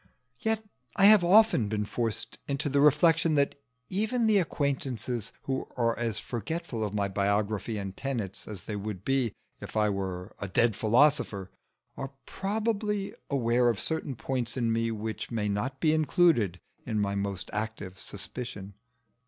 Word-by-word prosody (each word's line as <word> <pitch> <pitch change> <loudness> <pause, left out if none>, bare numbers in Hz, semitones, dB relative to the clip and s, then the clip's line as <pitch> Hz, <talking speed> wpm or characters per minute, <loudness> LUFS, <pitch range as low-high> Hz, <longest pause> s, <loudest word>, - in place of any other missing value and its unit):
Yet 220 -2 0 0.3
I 195 - +5
have 210 -2 +8
often 185 - +5
been 105 -1 -1
forced 115 0 -2
into 145 +2 -1
the 140 +1 +3
reflection 155 +2 +5
that 140 -1 +3 0.3
even 220 +5 +1
the 215 -2 +5
acquaintances 130 - -2
who 130 -1 -2
are 115 -1 +2
as 115 -3 -1
forgetful 120 - -3
of 105 -1 -3
my 100 -1 +1
biography 100 +2 0
and 95 -2 -5
tenets 115 -8 -4
as 100 -5 -7
they 105 - -4
would 100 -2 -5
be 135 -5 +1 0.2
if - - -7
I 105 -1 +3
were 95 -1 -4
a 100 - -2
dead 110 +3 +2
philosopher, 115 -4 +2 0.4
are 135 0 -6
probably 210 0 -1 0.2
aware 120 -2 +3
of 115 -4 0
certain 160 -4 -2
points 125 0 -3
in 115 -2 +1
me 115 0 +1
which 110 0 -4
may 110 -3 -1
not 120 +7 -2
be 155 -2 +3
included 155 - +3 0.2
in 110 - -1
my 100 -1 0
most 100 -2 -3
active 105 -3 -4
suspicion. 100 -1 -7
120 Hz, 155 wpm, -29 LUFS, 105-150 Hz, 0.4 s, have